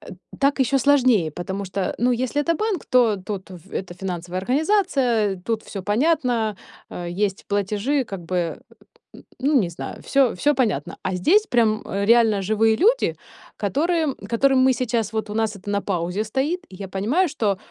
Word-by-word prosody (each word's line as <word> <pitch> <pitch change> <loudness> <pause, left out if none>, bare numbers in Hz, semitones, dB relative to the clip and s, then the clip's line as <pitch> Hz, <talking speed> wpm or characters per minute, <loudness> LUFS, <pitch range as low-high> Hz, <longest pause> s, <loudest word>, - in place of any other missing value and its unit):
э, - - -16 0.3
так 280 +1 +2
ещё 270 +1 +2
сложнее, 250 - +3
потому 190 +5 -5
что, 185 0 -2
ну, 245 +2 +2
если 255 +4 -1
это 335 +3 +1
банк, 425 -5 -2
то 240 -4 +3
тут 190 0 -6
в 180 +1 -13
это 185 -2 -4
финансовая 180 -1 -4
организация, 260 - +1
тут 225 0 -1
всё 195 - -7
понятно- 235 - +1 0.3
э, 175 -1 -6
есть 195 +2 -2
платежи, 210 +7 0
как 195 -5 -7
бы 175 -1 -2 0.8
ну 280 +1 +3
не 180 - -2
знаю, 170 - -8
всё 270 -4 +2
всё 290 +11 +2
понятно. 220 - -1
А 190 - -1
здесь 395 - +3
прям 225 -3 +2
реально 215 +1 +3
живые 220 +3 +2
люди, 460 - +2 0.4
которым 305 - 0
которым 265 +3 +3
мы 260 0 +5
сейчас 230 -3 -1
вот 220 -1 -2
у - - -4
нас 220 -1 0
это 200 +1 -9
на 200 0 0
паузе 180 +2 -2
стоит, 275 +10 -1
и 190 - -12
я 195 +1 -7
понимаю, 245 - +1
что 215 -9 0
220 Hz, 175 wpm, -22 LUFS, 195-270 Hz, 0.8 s, мы